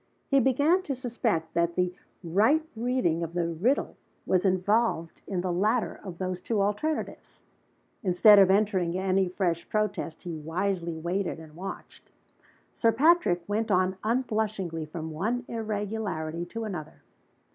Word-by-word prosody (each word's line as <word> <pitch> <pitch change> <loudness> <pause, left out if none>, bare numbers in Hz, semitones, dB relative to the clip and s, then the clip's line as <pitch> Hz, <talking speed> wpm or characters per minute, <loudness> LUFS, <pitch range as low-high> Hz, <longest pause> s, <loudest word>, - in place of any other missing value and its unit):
He 275 - +5
began 285 +8 +3
to 280 -7 -3
suspect 230 -9 -2
that 170 0 +1
the 180 0 +1 0.3
right 215 - +3
reading 230 -8 0
of 170 0 -4
the 175 -1 +1
riddle 210 - 0 0.3
was 185 +1 +2
involved 190 -2 +1
in 185 -3 -1
the 180 -1 -1
latter 215 +6 0
of 185 -4 -7
those 185 -1 -3
two 220 +2 -1
alternatives. 210 +11 -2 0.6
Instead 200 +3 +6
of 195 -1 +6
entering 190 -3 +2
any 190 0 +1
fresh 175 -2 -1
protest, 215 -6 -2
he 175 -2 -5
wisely 170 +2 -2
waited 175 +2 -2
and 160 -1 -12
watched. 190 +3 -9 0.6
Sir 230 - +3
Patrick 265 - +3
went 220 +2 -1
on 185 -1 +2
unblushingly 215 -8 -1
from 160 0 -6
one 220 +10 -2
irregularity 205 -7 -3
to 230 +5 -5
another. 165 -8 -7
195 Hz, 140 wpm, -28 LUFS, 170-225 Hz, 0.6 s, Instead